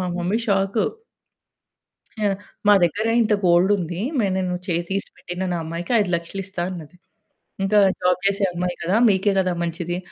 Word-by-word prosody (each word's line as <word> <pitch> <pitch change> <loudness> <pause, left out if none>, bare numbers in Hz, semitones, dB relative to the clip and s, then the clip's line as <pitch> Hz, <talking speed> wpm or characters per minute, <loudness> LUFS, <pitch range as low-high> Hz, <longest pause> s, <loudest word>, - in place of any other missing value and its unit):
మా 185 - -1
mummy 180 +6 0
shock. 195 +2 +1 1.4
ఆ! - - +3 0.4
మా 205 - +8
దగ్గర 205 +6 +1 0.2
ఇంత 215 -1 +2
గోల్డ్ 175 +3 +4
ఉంది. 175 0 -4 0.2
మే 205 - +2
"నేను 185 -1 -1
చేయి 170 -1 0
తీసిపెట్టినా 190 -2 -4 0.2
అమ్మాయికి 170 +5 -5
500000 180 -1 -1
ఇస్తా 190 -3 -5
అన్నది. 170 -3 -9 0.7
ఇంకా 200 +2 +2 0.2
జాబ్ 180 0 +2
చేసే 200 0 +1
అమ్మాయి 175 0 -2
కదా, 175 +4 0
మీకే 195 +1 +2
కదా 185 -1 +1
మంచిది" 170 +1 -3
180 Hz, 150 wpm, -22 LUFS, 175-195 Hz, 1.4 s, మా